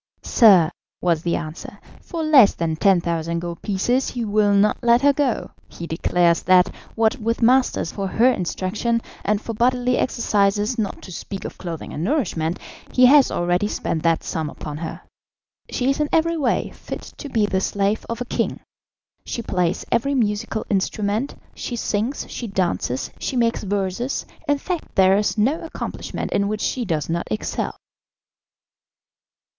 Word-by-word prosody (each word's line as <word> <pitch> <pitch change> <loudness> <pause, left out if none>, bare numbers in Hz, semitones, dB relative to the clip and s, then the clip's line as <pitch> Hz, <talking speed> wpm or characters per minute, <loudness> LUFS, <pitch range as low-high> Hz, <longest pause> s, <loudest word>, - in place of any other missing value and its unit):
"Sir," 190 -9 +6 0.3
was 170 -3 +1
the 170 0 0
answer, 155 -1 -6 0.2
"for 335 -3 -4
less 280 -9 +6
than 165 -1 -1
10,000 170 -2 +1
gold 170 0 -5
pieces 240 +6 0
he 240 -2 -3
will 210 -1 +2
not 205 +1 +3
let 240 +1 +4
her 285 0 +6
go; 275 -4 -1 0.2
he 170 - -8
declares 170 +1 +2
that, 185 -1 +4 0.2
what 225 +3 +2
with 230 +1 -1
masters 250 -7 +3
for 195 -1 -3
her 220 +5 +2
instruction, 210 +3 -1 0.2
and 210 0 +1
for 230 - -6
bodily 250 +2 +2
exercises, 210 -1 +1
not 205 -3 -3
to 185 - -9
speak 195 +2 -6
of - - -7
clothing 170 -3 -6
and 155 - -3
nourishment, 180 - 0 0.3
he 255 - +5
has 275 +1 +7
already 175 +3 0
spent 165 -5 -2
that 165 0 +1
sum 160 -2 -3
upon 150 0 -7
her. 160 +1 -6 0.7
She 255 +2 +1
is 275 - -2
in 300 -1 0
every 335 +1 +2
way 280 -7 0
fit - - -8
to 290 - -7
be 220 -5 +2
the 190 -2 0
slave 200 +2 0
of 230 +1 -4
a - - -2
king; - - -2 0.6
she 235 - -4
plays 180 -3 -1
every 275 +5 +1
musical 215 -2 -1
instrument, 205 +5 -1 0.2
she 245 - -5
sings, 225 +3 -2
she 235 - -6
dances, 170 - -1
she - - -3
makes 230 -2 +1
verses, 200 +5 -2 0.2
in 290 0 +3
fact 350 +4 -5
there 190 0 +5
is 210 +2 0
no 265 +10 +2
accomplishment 325 - -5
in 200 0 +1
which 210 0 -2
she 250 -2 -1
does 160 -7 -1
not 170 +1 -2
excel." 110 - -3
210 Hz, 165 wpm, -22 LUFS, 175-245 Hz, 0.7 s, has